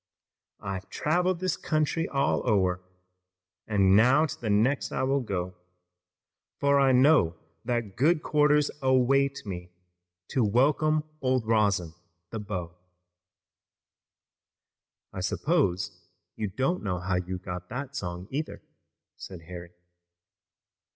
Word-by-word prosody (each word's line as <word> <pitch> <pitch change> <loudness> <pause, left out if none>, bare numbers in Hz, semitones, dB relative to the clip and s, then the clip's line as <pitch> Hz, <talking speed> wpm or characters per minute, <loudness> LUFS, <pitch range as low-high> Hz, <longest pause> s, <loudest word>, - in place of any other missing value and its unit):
"I've 95 -1 -5
traveled 180 +3 0
this 185 -1 0
country 155 +1 -1
all 140 0 +1
o'er, 95 -4 +2 0.9
And 100 -3 +4
now 130 +8 +5
to 155 - -7
the 110 - -2
next 115 +7 +2
I - - -1
will 135 +1 +2
go, 90 -7 -3 1.1
For 140 0 +3
I 135 -1 +4
know 130 - +4 0.3
that 120 -5 -2
good 155 +4 +3
quarters 150 -1 +3
await 135 +1 +2
me 90 -3 -6 0.6
To 130 - +1
welcome 150 +8 +2 0.2
old 130 -3 +1
Rosin, 100 -7 +1 0.4
the 115 - -4
beau." 90 -5 -5 2.4
"I - - -5
suppose 95 - 0 0.3
you 110 - -2
don't 130 - -1
know 90 -4 -2
how 90 +1 -1
you 90 +1 -3
got 90 -1 -7
that 135 +3 -6
song, 90 -5 -5
either," 150 +4 -4 0.5
said 90 -3 -10
Harry. 85 0 -9
120 Hz, 115 wpm, -27 LUFS, 95-140 Hz, 2.4 s, now